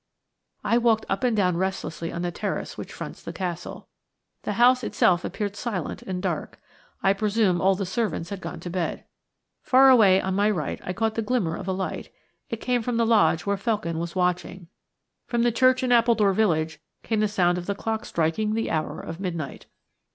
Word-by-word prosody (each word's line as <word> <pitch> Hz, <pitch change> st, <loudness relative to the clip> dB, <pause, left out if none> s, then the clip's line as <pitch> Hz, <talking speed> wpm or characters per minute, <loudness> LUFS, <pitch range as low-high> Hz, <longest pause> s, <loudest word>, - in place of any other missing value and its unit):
I 235 Hz, -, +3 dB
walked 225 Hz, -2 st, +2 dB
up 195 Hz, -, -1 dB
and 240 Hz, -3 st, +2 dB
down 180 Hz, -4 st, +2 dB
restlessly 180 Hz, -3 st, -3 dB
on 170 Hz, -, -4 dB
the 175 Hz, -, -1 dB
terrace -, -, -4 dB
which -, -, -8 dB
fronts -, -, -8 dB
the -, -, -6 dB
Castle. 180 Hz, -2 st, -5 dB, 0.5 s
The 210 Hz, -, -3 dB
house 250 Hz, +3 st, +4 dB
itself 180 Hz, -4 st, +2 dB
appeared 205 Hz, -2 st, -3 dB
silent 200 Hz, -6 st, -4 dB
and 185 Hz, -1 st, -5 dB
dark: 170 Hz, -5 st, -3 dB, 0.4 s
I 195 Hz, -, +5 dB
presume 205 Hz, -3 st, +1 dB
all 190 Hz, +1 st, +4 dB
the 195 Hz, +1 st, -3 dB
servants 190 Hz, -3 st, -2 dB
had 200 Hz, -2 st, -5 dB
gone -, -, -6 dB
to 175 Hz, -, -6 dB
bed. 175 Hz, -2 st, -2 dB, 0.6 s
Far 265 Hz, +1 st, +6 dB
away 200 Hz, -7 st, +6 dB
on 190 Hz, 0 st, -2 dB
my 205 Hz, +2 st, +3 dB
right 170 Hz, -9 st, -2 dB
I -, -, -3 dB
caught 220 Hz, +4 st, 0 dB
the 225 Hz, -, -1 dB
glimmer 210 Hz, -7 st, 0 dB
of -, -, -7 dB
a -, -, 0 dB
light. 190 Hz, 0 st, -4 dB, 0.4 s
It 230 Hz, -, -3 dB
came 245 Hz, -1 st, +1 dB
from 235 Hz, +1 st, -2 dB
the 230 Hz, -, +3 dB
lodge 175 Hz, -7 st, +3 dB
where 200 Hz, 0 st, 0 dB
Felkin 195 Hz, -6 st, -1 dB
was 170 Hz, +1 st, -5 dB
watching. 180 Hz, -1 st, -1 dB, 0.6 s
From 235 Hz, -1 st, +1 dB
the 240 Hz, -, +3 dB
church 255 Hz, +2 st, +3 dB
in 250 Hz, -, +1 dB
Appledore 230 Hz, -4 st, +4 dB
village 165 Hz, -7 st, +1 dB, 0.2 s
came 220 Hz, -2 st, 0 dB
the 215 Hz, -, +3 dB
sound 180 Hz, -4 st, +1 dB
of 175 Hz, -, -8 dB
the 200 Hz, -, -1 dB
clock 220 Hz, +2 st, -3 dB
striking 170 Hz, +7 st, 0 dB
the 225 Hz, -, -1 dB
hour 155 Hz, -1 st, -2 dB
of 165 Hz, +1 st, -7 dB
midnight. 170 Hz, -7 st, -5 dB
195 Hz, 200 wpm, -25 LUFS, 175-225 Hz, 0.6 s, Far